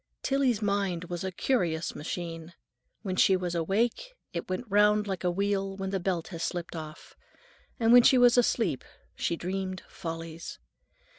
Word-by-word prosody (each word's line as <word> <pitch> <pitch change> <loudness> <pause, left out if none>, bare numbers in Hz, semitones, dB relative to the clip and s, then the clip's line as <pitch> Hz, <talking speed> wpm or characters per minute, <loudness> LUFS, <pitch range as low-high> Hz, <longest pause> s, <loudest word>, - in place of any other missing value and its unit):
Tillie's 260 -6 +1
mind 200 -4 0
was 175 0 -3
a 190 - -2
curious 175 -6 0
machine; 165 +1 -6 0.5
when 185 -2 -2
she 190 +1 +5
was 180 -1 -3
awake 220 - -1 0.2
it - - -4
went 185 +7 -2
round 210 +1 +4
like 190 -3 -4
a 180 - +2
wheel 195 +1 -1
when 190 -1 -3
the 195 - 0
belt 175 -2 -2
has 165 -3 -7
slipped 175 0 -3
off, 155 -1 -9 0.6
and 230 0 +4
when 245 - +10
she 255 - +5
was 245 -1 +6
asleep 245 -2 +2 0.3
she 170 - -1
dreamed 185 +2 -4
follies. 165 -1 -7
190 Hz, 160 wpm, -28 LUFS, 170-210 Hz, 0.6 s, when